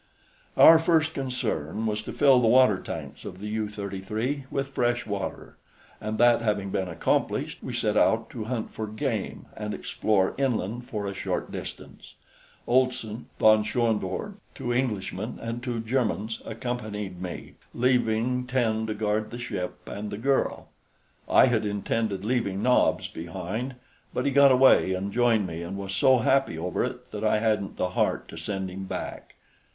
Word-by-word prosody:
Our 165 0 +9
first 160 -1 +2
concern 115 - -2
was 105 -1 -1
to - - -7
fill 135 -3 +5
the 115 - +3
water 125 -4 +5
tanks - - -7
of 90 - -7
the 105 +2 -6
U 110 -1 -2
33 105 +7 -3
with 135 -1 -2
fresh 120 -2 0
water, 100 -3 -5 0.4
and 110 0 -3
that 120 0 +5
having 105 -3 -1
been 95 -1 -1
accomplished, 85 - -1
we - - -5
set - - 0
out - - +3
to 110 -3 -5
hunt 115 -1 -3
for 110 - -4
game 110 0 -3
and 105 -1 -4
explore 100 -3 +1
inland 120 -3 -1
for 105 -6 -4
a 100 - -3
short - - -3
distance. - - -9 0.5
Olson, 125 -3 0
von 110 -1 +5
Schoenvorts, 115 - -1 0.2
two 120 - -2
Englishmen 110 -3 -2
and 115 +1 -4
two 120 -2 -3
Germans 115 -2 -1
accompanied 110 -5 -4
me, 90 -1 -6 0.2
leaving 125 0 +1
ten 110 -4 0
to 110 - -2
guard 105 0 -1
the 120 - -7
ship 100 -7 -5
and 105 +1 -5
the 100 - -5
girl. 135 +4 0 0.6
I - - +7
had 120 -4 +1
intended 105 -1 -1
leaving 105 -5 0
Nobs 125 0 +3
behind, 95 +10 -5 0.4
but - - 0
he 140 - +2
got 140 0 +7
away 130 -7 +5
and 100 +2 -3
joined 115 -4 +3
me 85 -2 -5
and 90 +3 -5
was 100 -1 -5
so 130 +2 +5
happy 130 -6 +2
over 85 +2 -1
it - - -6
that 105 0 -5
I 110 0 +3
hadn't 105 -2 0
the 90 - 0
heart 90 - 0
to - - -9
send 95 +3 -4
him 95 +1 -6
back. - - -6
110 Hz, 165 wpm, -26 LUFS, 100-125 Hz, 0.6 s, Our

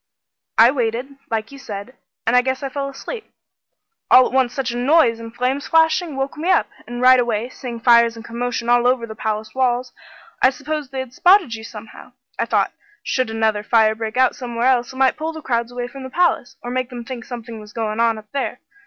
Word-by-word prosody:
"I 230 +2 +7
waited, 250 +1 -2
like 225 0 -2
you 275 - -11
said, 205 0 -7 0.3
an' 230 - +2
I 250 - +6
guess 260 +2 -2
I 275 - -2
fell 275 +1 -3
asleep. 435 - -8 0.8
All 255 - +8
at - - -3
once 260 -2 +3
such 260 -3 -1
a - - -5
noise, 245 -2 +3
and 230 0 -8
flames 255 +4 -2
flashing, 320 -1 +2
woke 270 +1 -2
me 330 +4 -2
up, 370 - +3 0.2
and 240 0 -5
right 255 0 +7
away, 235 -1 -1
seeing 245 -2 -7
fires 235 0 +5
and 225 0 -10
commotion 235 0 -3
all 240 0 +4
over 250 -2 +2
the 220 - -8
palace 215 0 -3
walls, 250 -1 0 0.5
I 260 - +7
supposed 290 +1 -5
they 265 -1 -3
had 255 -2 -9
spotted 360 - +4
you 220 -1 -6
somehow. 220 -1 -11 0.3
I - - +1
thought - - +1 0.3
should 255 -3 0
another 220 -1 0
fire 220 0 +3
break 220 +1 -5
out 260 -1 +4
somewhere 240 -2 -3
else, 250 -1 +2
it - - -13
might 265 0 +3
pull 320 +1 -3
the 315 - -8
crowds 235 -1 -1
away 245 0 -4
from 270 +2 -10
the 260 - -7
palace, 345 -3 +1
or 245 - -5
make 255 0 -2
them 240 -2 -8
think 245 -2 -6
something 230 -2 -8
was 210 -1 -12
goin' 220 -1 -3
on 230 -1 +2
up 210 -1 -13
there. 280 - -3
245 Hz, 225 wpm, -20 LUFS, 230-265 Hz, 0.8 s, All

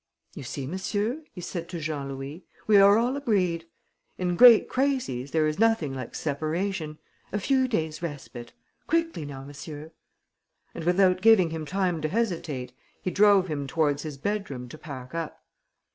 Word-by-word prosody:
"You - - -8
see, 135 +1 -5
monsieur," 205 - -2
he 180 - -9
said 170 -1 -5
to 175 - -5
Jean 150 -3 -3
Louis, 135 +5 -7 0.2
"we 210 -2 +5
are 200 +1 +7
all 245 +3 +1
agreed. 185 -11 0 0.5
In 180 -1 -1
great 235 +1 +8
crises, 255 - -1
there 155 0 +2
is 155 +2 -1
nothing 225 -11 +2
like 130 -3 -6
separation... 155 +2 -2 0.3
a - - -1
few 260 +4 +2
days' 160 -10 -2
respite. 135 -7 -7 0.4
Quickly 330 - 0
now, 135 -2 -7
monsieur." 150 +2 -9 0.8
And, 160 - -6
without 185 +1 +3
giving 200 -7 +5
him 160 -2 -5
time 180 -2 0
to 155 - -1
hesitate, 165 - -2 0.3
he 185 - -3
drove 200 -2 +5
him 145 -4 -3
towards 145 0 +1
his 150 -3 -6
bedroom 145 -7 -3
to 155 - -10
pack 130 -4 -9
up. 165 -2 -5
165 Hz, 160 wpm, -26 LUFS, 145-205 Hz, 0.8 s, great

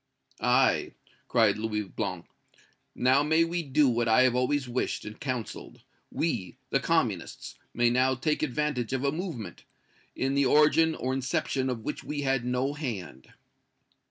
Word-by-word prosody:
"Aye!" - - +2 0.3
cried 110 -4 +3
Louis 105 -1 -2
Blanc, 95 - -5 0.7
"we - - -7
may 125 - +5
now 165 +1 +1
do 145 +1 +4
what 120 -1 +1
I 115 +3 +5
have 130 -1 +3
always 125 +2 0
wished 125 +1 -2
and 105 +1 -9
counseled 130 -5 -5 0.3
we, 115 - -2
the - - +3
Communists, - - -1 0.2
may 120 0 +2
now 130 +1 +2
take 150 +4 -1
advantage 145 -4 -1
of 130 0 -1
a 140 - +2
movement, 155 - -6 0.5
in 135 +1 -1
the 140 -1 +3
origin 155 +3 +4
or 130 +1 -2
inception 130 0 -1
of 120 -3 -3
which 150 - -4
we 150 -1 -4
had 135 -2 +1
no 125 +3 0
hand." 100 - -6
130 Hz, 155 wpm, -28 LUFS, 120-145 Hz, 0.7 s, may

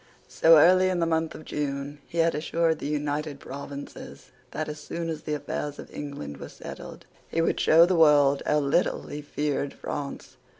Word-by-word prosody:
So 165 0 +6
early 185 +4 +6
as 185 - 0
the 170 - +1
month 160 -1 0
of 155 - -10
June 145 0 -4
he 170 - -8
had 165 0 +3
assured 160 +2 0
the - - -4
United 150 0 -2
Provinces 140 +1 -9 0.2
that, 155 - -4
as 150 0 -6
soon 165 +2 -5
as 160 -2 -4
the 150 - -2
affairs 145 0 -4
of - - -11
England 140 - -6
were - - -8
settled, - - -10 0.2
he - - -2
would 165 - +1
show 165 +2 +6
the 185 - +1
world 145 -4 +5
how 150 - +3
little 140 +5 +1
he 150 - -6
feared 145 -1 -2
France. 140 -1 -6
150 Hz, 185 wpm, -26 LUFS, 145-165 Hz, 0.2 s, So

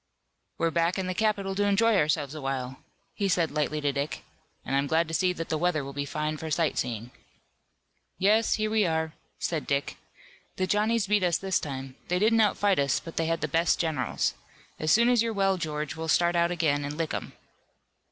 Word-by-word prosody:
"We're 165 0 +1
back 170 +2 +1
in 190 - -1
the 185 - -2
capital 200 -1 0
to 205 +1 0
enjoy 210 +3 +3
ourselves 150 -4 +1
a 155 - -7
while," 130 -1 -3 0.3
he 200 - -1
said 170 -3 +1
lightly 150 0 -1
to 145 -1 +1
Dick, 140 +2 -3 0.4
"and 135 - -1
I'm 140 +1 +1
glad 165 +3 +2
to - - -6
see 180 +2 +2
that 165 -2 -6
the 155 - -1
weather 170 -3 +1
will 140 +1 -7
be 140 +1 -3
fine 150 +2 -2
for 160 +1 -6
sight 155 0 +1
seeing." 115 0 -3 1.1
"Yes, 215 +4 +3
here 215 0 -1
we 220 -1 +3
are," 160 -1 -1 0.2
said 160 -3 -2
Dick. 140 0 -1 0.6
"The 185 - 0
Johnnies 210 +2 +1
beat 205 +1 +2
us 175 -2 +2
this 190 -2 0
time. 135 -2 -6
They 180 - +1
didn't 220 +4 +3
outfight 205 -3 +2
us, 140 -1 +2
but 165 - -10
they 165 - 0
had 165 0 -1
the - - 0
best 165 +4 +2
generals. 160 -4 -1 0.5
As 155 0 +1
soon 235 +5 +5
as 245 -2 +4
you're 230 -1 0
well, 195 -2 +2
George, 150 -4 -3
we'll 160 0 -5
start 175 +2 +3
out 170 0 +3
again 155 -5 +1
and 145 +1 -5
lick 165 -2 -2
'em." - - -5
165 Hz, 210 wpm, -27 LUFS, 150-195 Hz, 1.1 s, soon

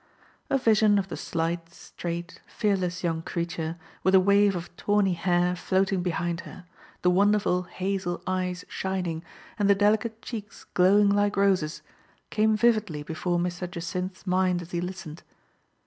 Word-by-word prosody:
A 275 - +3
vision 215 -4 +4
of 195 -1 -1
the 165 - -4
slight, 165 0 -3
straight, 170 +1 -6
fearless 185 -4 -1
young 165 -2 0
creature, 170 -1 -3 0.2
with 190 0 +4
a - - +9
wave 200 +1 +4
of 175 0 -6
tawny 205 -2 +2
hair 175 0 +1
floating 190 +1 +1
be 180 - -1
hind 170 +1 -2
her, 180 - -11 0.4
the 180 - +5
wonderful 200 -1 +3
hazel 185 -1 -2
eyes 185 -1 -2
shining, 180 -4 -3 0.4
and 205 -1 +3
the 200 - +6
delicate 215 +3 +1
cheeks 210 -4 -7
glowing 200 +3 +5
like 205 0 +2
roses, 185 -6 +1 0.5
came 215 0 +3
vividly 215 -10 +2
before 170 +3 -2
Mr. 175 0 -2
Jacynth's 180 +2 -5
mind 185 -1 +1
as 170 - -13
he 175 - -1
listened. 180 -3 -6
185 Hz, 150 wpm, -27 LUFS, 175-200 Hz, 0.5 s, a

